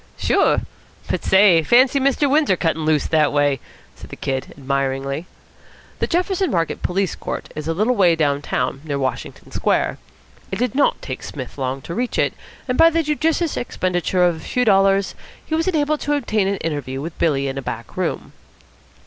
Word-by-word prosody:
"Sure. -, -, +2 dB, 0.5 s
But -, -, -2 dB
say, 190 Hz, -4 st, +5 dB
fancy 255 Hz, -, +4 dB
Mr. 275 Hz, +2 st, +2 dB
Windsor 290 Hz, -7 st, +3 dB
cuttin' 160 Hz, -2 st, -1 dB
loose 155 Hz, -2 st, +2 dB
that 155 Hz, -2 st, +2 dB
way!" 145 Hz, -2 st, +2 dB, 0.4 s
said -, -, -12 dB
the -, -, -8 dB
Kid 135 Hz, -1 st, -3 dB
admiringly. 140 Hz, +3 st, -2 dB, 0.7 s
The -, -, 0 dB
Jefferson 365 Hz, +2 st, 0 dB
Market 165 Hz, -2 st, -1 dB
Police 190 Hz, +1 st, 0 dB
Court -, -, -6 dB
is 155 Hz, 0 st, -5 dB
a 165 Hz, -, 0 dB
little 215 Hz, +7 st, +2 dB
way 180 Hz, -5 st, +4 dB
down 145 Hz, -3 st, +1 dB
town, 130 Hz, -1 st, -2 dB
near 145 Hz, -3 st, -3 dB
Washington 130 Hz, -1 st, -4 dB
Square. -, -, 0 dB, 0.5 s
It 190 Hz, -, -2 dB
did 245 Hz, -2 st, -1 dB
not 280 Hz, +1 st, +2 dB
take 130 Hz, -, -5 dB
Psmith 130 Hz, -3 st, -7 dB
long 135 Hz, -1 st, -3 dB
to 170 Hz, -, -6 dB
reach 245 Hz, +6 st, -2 dB
it, -, -, +2 dB, 0.3 s
and 250 Hz, -, -1 dB
by 330 Hz, 0 st, +8 dB
the 330 Hz, 0 st, +1 dB
judicious 310 Hz, +2 st, 0 dB
expenditure 180 Hz, -4 st, 0 dB
of 175 Hz, -2 st, +2 dB
a -, -, -10 dB
few 250 Hz, +10 st, -1 dB
dollars 195 Hz, -1 st, +3 dB, 0.3 s
he -, -, -5 dB
was 325 Hz, +2 st, +1 dB
enabled 305 Hz, -4 st, +1 dB
to 295 Hz, -, -1 dB
obtain 215 Hz, -8 st, 0 dB
an 200 Hz, 0 st, 0 dB
interview 145 Hz, -6 st, -4 dB
with 165 Hz, +4 st, -6 dB
Billy 140 Hz, -4 st, +1 dB
in 135 Hz, 0 st, -3 dB
a -, -, -5 dB
back 115 Hz, -2 st, -6 dB
room. -, -, -3 dB
175 Hz, 185 wpm, -20 LUFS, -, 0.7 s, by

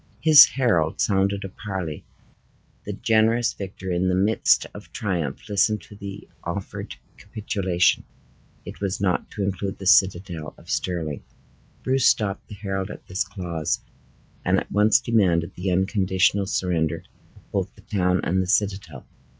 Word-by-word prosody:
His 155 Hz, -2 st, +10 dB
herald 90 Hz, -, +1 dB
sounded 100 Hz, 0 st, +1 dB
a 95 Hz, -, -5 dB
parley. 95 Hz, -5 st, -5 dB, 0.8 s
The -, -, -4 dB
generous 115 Hz, +2 st, +2 dB
victor, 95 Hz, -1 st, -6 dB
in 90 Hz, +1 st, +1 dB
the 90 Hz, -, +1 dB
midst 100 Hz, +4 st, +3 dB
of -, -, -12 dB
triumph, 85 Hz, -9 st, -3 dB
listened 105 Hz, 0 st, +1 dB
to 105 Hz, -, -14 dB
the 100 Hz, -1 st, -8 dB, 0.2 s
offered 90 Hz, +3 st, -5 dB, 0.2 s
capitulation. 95 Hz, -4 st, 0 dB, 0.6 s
It -, -, -9 dB
was 100 Hz, -1 st, -2 dB
not 95 Hz, -2 st, 0 dB
to 105 Hz, -, -4 dB
include 95 Hz, 0 st, -3 dB
the 95 Hz, -, -9 dB
citadel 90 Hz, -4 st, +2 dB
of -, -, -10 dB
Stirling. 80 Hz, -6 st, -2 dB, 0.6 s
Bruce 130 Hz, 0 st, +2 dB
stopped 100 Hz, -3 st, +1 dB
the 105 Hz, -, -9 dB
herald 95 Hz, -1 st, -3 dB
at -, -, -10 dB
this 95 Hz, -, -1 dB
clause, 90 Hz, -6 st, -3 dB, 0.6 s
and -, -, +2 dB
at -, -, -9 dB
once 105 Hz, +3 st, +4 dB
demanded 95 Hz, -9 st, +1 dB
the 90 Hz, +2 st, -3 dB
unconditional 95 Hz, +1 st, +1 dB
surrender 85 Hz, -4 st, -1 dB, 0.3 s
of -, -, -22 dB
both -, -, -2 dB
the -, -, -17 dB
town 90 Hz, -3 st, 0 dB
and 95 Hz, +1 st, 0 dB
citadel. 100 Hz, -1 st, -1 dB
95 Hz, 145 wpm, -24 LUFS, 90-105 Hz, 0.8 s, His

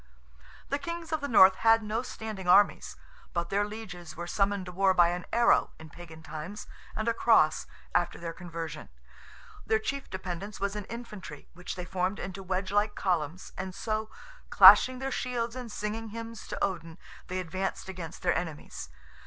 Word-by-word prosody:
The 280 Hz, -, 0 dB
kings 335 Hz, +2 st, -6 dB
of 315 Hz, -2 st, -1 dB
the 285 Hz, -, -2 dB
North 190 Hz, -6 st, +7 dB
had 225 Hz, 0 st, +4 dB
no 215 Hz, +2 st, -1 dB
standing 215 Hz, -6 st, -7 dB
armies, 200 Hz, +3 st, +4 dB, 0.4 s
but 170 Hz, -1 st, -2 dB
their 200 Hz, +1 st, +2 dB
lieges 190 Hz, -6 st, -8 dB
were 175 Hz, -, -4 dB
summoned 195 Hz, +1 st, 0 dB
to 180 Hz, -, -7 dB
war 190 Hz, +1 st, +3 dB
by 175 Hz, -1 st, +6 dB
an 175 Hz, 0 st, -4 dB
arrow 235 Hz, 0 st, +3 dB
in 160 Hz, -1 st, -12 dB
Pagan 160 Hz, -1 st, -12 dB
times, 160 Hz, +6 st, -7 dB, 0.3 s
and 220 Hz, -, -2 dB
a 230 Hz, -, +3 dB
cross 155 Hz, -10 st, +3 dB, 0.3 s
after 175 Hz, 0 st, +1 dB
their 170 Hz, -1 st, -5 dB
conversion. 165 Hz, -3 st, -7 dB, 0.7 s
Their 220 Hz, -, +2 dB
chief 275 Hz, +5 st, -4 dB
dependence 185 Hz, +2 st, -6 dB
was 200 Hz, +1 st, -1 dB
in 210 Hz, -2 st, -5 dB
infantry, 210 Hz, -10 st, -9 dB
which 180 Hz, +1 st, -6 dB
they 180 Hz, -1 st, -5 dB
formed 185 Hz, +2 st, -1 dB
into 190 Hz, 0 st, -6 dB
wedge 185 Hz, 0 st, -2 dB
like 205 Hz, +1 st, +1 dB
columns, 175 Hz, -2 st, -2 dB
and 185 Hz, -1 st, -5 dB
so, 215 Hz, -1 st, -2 dB, 0.4 s
clashing 255 Hz, 0 st, +9 dB
their 265 Hz, +1 st, -3 dB
shields 240 Hz, -2 st, -2 dB
and 250 Hz, -3 st, -6 dB
singing 215 Hz, +2 st, -4 dB
hymns 230 Hz, +1 st, -8 dB
to -, -, -5 dB
Odin, 165 Hz, -4 st, -2 dB, 0.3 s
they 185 Hz, 0 st, -3 dB
advanced 185 Hz, +3 st, -3 dB
against 180 Hz, -4 st, -7 dB
their 175 Hz, -, +2 dB
enemies. 160 Hz, -4 st, -5 dB
190 Hz, 175 wpm, -29 LUFS, 175-220 Hz, 0.7 s, clashing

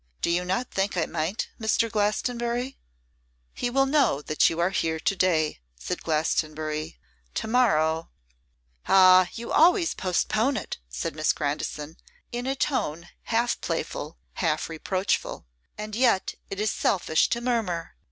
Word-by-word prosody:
Do 175 Hz, +1 st, +2 dB
not 190 Hz, +7 st, 0 dB
you -, -, -19 dB
think 195 Hz, 0 st, 0 dB
I 165 Hz, -, +2 dB
might, 170 Hz, +6 st, -2 dB
Mr. 225 Hz, +1 st, +2 dB
Glastonbury?' 235 Hz, +4 st, -1 dB, 0.7 s
'He 245 Hz, -, -2 dB
will 270 Hz, +2 st, +3 dB
know 270 Hz, -, +2 dB
that 155 Hz, -, +3 dB
you 165 Hz, -, -4 dB
are 175 Hz, +2 st, +2 dB
here 160 Hz, -4 st, 0 dB
to 195 Hz, -, 0 dB
day,' 160 Hz, -, +1 dB, 0.2 s
said 60 Hz, -, -4 dB
Glastonbury. 155 Hz, 0 st, -1 dB, 0.4 s
'To -, -, -2 dB
morrow 165 Hz, -10 st, +2 dB, 0.4 s
' -, -, -31 dB
'Ah! 185 Hz, -1 st, +7 dB
you 235 Hz, 0 st, -6 dB
always 340 Hz, +1 st, +4 dB
postpone 215 Hz, +8 st, 0 dB
it,' -, -, -5 dB
said 60 Hz, -, -4 dB
Miss 155 Hz, 0 st, +2 dB
Grandison, 150 Hz, +2 st, -3 dB, 0.3 s
in 245 Hz, +1 st, -3 dB
a 270 Hz, -, 0 dB
tone 175 Hz, -, -1 dB, 0.2 s
half 235 Hz, +1 st, 0 dB
playful, -, -, -4 dB, 0.2 s
half -, -, 0 dB
reproachful; 185 Hz, -, -2 dB, 0.3 s
'and 210 Hz, 0 st, -5 dB
yet 230 Hz, -5 st, +2 dB, 0.2 s
it 195 Hz, -, -5 dB
is 215 Hz, 0 st, +1 dB
selfish 165 Hz, -4 st, +1 dB
to 235 Hz, -, 0 dB
murmur. 225 Hz, -9 st, -1 dB
185 Hz, 145 wpm, -26 LUFS, 160-235 Hz, 0.7 s, Ah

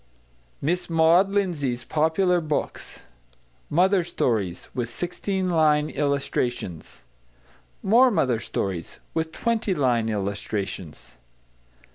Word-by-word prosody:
MISS 175 Hz, +5 st, -1 dB
MAUD 165 Hz, +4 st, +4 dB
LINDSAY'S 160 Hz, -12 st, -1 dB
POPULAR 175 Hz, +3 st, +2 dB
BOOKS 155 Hz, -2 st, -4 dB, 0.7 s
=Mother 185 Hz, +3 st, +3 dB
Stories= 110 Hz, -, -1 dB
With 120 Hz, -2 st, -2 dB
16 185 Hz, -, -2 dB
Line 155 Hz, -3 st, +3 dB
Illustrations. 135 Hz, -, -2 dB, 0.8 s
=More 240 Hz, +6 st, +6 dB
Mother 130 Hz, -, +1 dB
Stories= 95 Hz, -6 st, -4 dB
With 160 Hz, 0 st, -1 dB
20 225 Hz, -1 st, 0 dB
Line 120 Hz, -6 st, +1 dB
Illustrations. 100 Hz, -, -4 dB
150 Hz, 90 wpm, -25 LUFS, 115-180 Hz, 0.8 s, =More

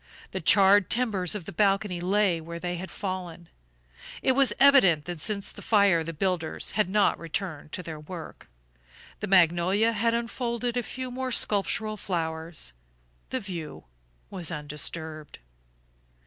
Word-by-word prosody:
The -, -, -4 dB
charred 200 Hz, -1 st, +5 dB
timbers 210 Hz, -7 st, +1 dB
of 195 Hz, -5 st, -5 dB
the -, -, -7 dB
balcony 195 Hz, -1 st, +1 dB
lay 190 Hz, -2 st, +1 dB
where 170 Hz, +1 st, -7 dB
they 175 Hz, 0 st, -3 dB
had 185 Hz, +2 st, -7 dB
fallen. 180 Hz, -4 st, -6 dB, 0.7 s
It -, -, +4 dB
was 260 Hz, -3 st, +4 dB
evident 195 Hz, -, +6 dB
that 175 Hz, -3 st, -6 dB
since 200 Hz, +1 st, -2 dB
the -, -, -12 dB
fire 200 Hz, -6 st, +3 dB
the 165 Hz, -, -5 dB
builders 170 Hz, 0 st, -2 dB
had 210 Hz, -3 st, 0 dB
not 205 Hz, +1 st, +2 dB
returned 165 Hz, -2 st, -5 dB
to 180 Hz, -, -4 dB
their 160 Hz, -2 st, -7 dB
work. 165 Hz, +2 st, -10 dB, 0.7 s
The 210 Hz, -, -4 dB
magnolia 185 Hz, +4 st, +3 dB
had 230 Hz, +2 st, +1 dB
unfolded 235 Hz, 0 st, -2 dB
a 245 Hz, -, +1 dB
few 255 Hz, +2 st, -6 dB
more 260 Hz, +1 st, -3 dB
sculptural 215 Hz, 0 st, +1 dB
flowers; 160 Hz, -, -3 dB, 0.6 s
the 260 Hz, -, -2 dB
view 180 Hz, -8 st, -7 dB, 0.5 s
was 180 Hz, -5 st, -1 dB
undisturbed. 155 Hz, 0 st, -4 dB
190 Hz, 145 wpm, -27 LUFS, 165-215 Hz, 0.7 s, evident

